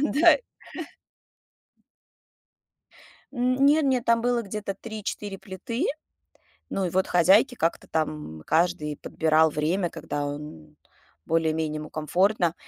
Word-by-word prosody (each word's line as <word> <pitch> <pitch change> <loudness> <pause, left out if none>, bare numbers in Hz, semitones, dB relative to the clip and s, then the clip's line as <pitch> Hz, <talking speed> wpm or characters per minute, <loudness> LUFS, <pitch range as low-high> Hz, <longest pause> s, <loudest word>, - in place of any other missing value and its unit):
дай. 335 - +5 2.9
Н 250 -1 +1
нет 300 +2 +5
нет, 260 -3 +1
там 230 0 +3
было 240 0 +1
где-то 200 -1 -5
3-4 210 -2 -6
плиты. 230 - -4 0.8
Ну 195 -1 -1
и - - -3
вот, 190 +2 +1
хозяйки 190 +8 +4
как-то 165 -8 -1
там 150 - -3
каждый 155 -3 +1
подбирал 160 +1 +2
время, 165 +5 0
когда 145 0 -4
он 145 - -8 0.5
более-менее 160 -1 0
ему 155 0 -8
комфортно. 175 +3 +1
180 Hz, 110 wpm, -26 LUFS, 155-230 Hz, 2.9 s, дай